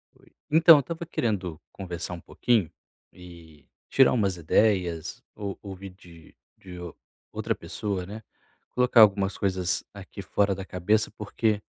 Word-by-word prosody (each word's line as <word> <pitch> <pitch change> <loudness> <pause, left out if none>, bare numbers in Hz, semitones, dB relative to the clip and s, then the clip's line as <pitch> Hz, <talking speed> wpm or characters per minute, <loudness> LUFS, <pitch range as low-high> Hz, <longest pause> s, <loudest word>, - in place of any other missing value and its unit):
Oi. - - -24 0.2
Então, 160 +1 +8
eu - - +3
estava 165 +5 -5
querendo 100 - -2
conversar 90 -2 -6
um 85 - -7
pouquinho, 110 -10 0 0.4
e 85 -5 -15 0.2
tirar 135 -2 +5
umas 100 -6 0
ideias, 85 -1 +1
ou 100 -2 -5
ouvir 95 -1 -8
de 85 -3 -17 0.2
de 90 -2 -11
ou 85 -3 -7 0.4
outra - - -2
pessoa, 100 -4 -4
né, 105 +4 -8 0.5
colocar 125 -1 +3
algumas 100 -2 +4
coisas 95 -2 0
aqui 100 0 -9
fora 100 +1 +1
da 95 0 -6
cabeça, 105 +4 0
porque 105 0 -1
95 Hz, 145 wpm, -26 LUFS, 90-105 Hz, 0.5 s, Então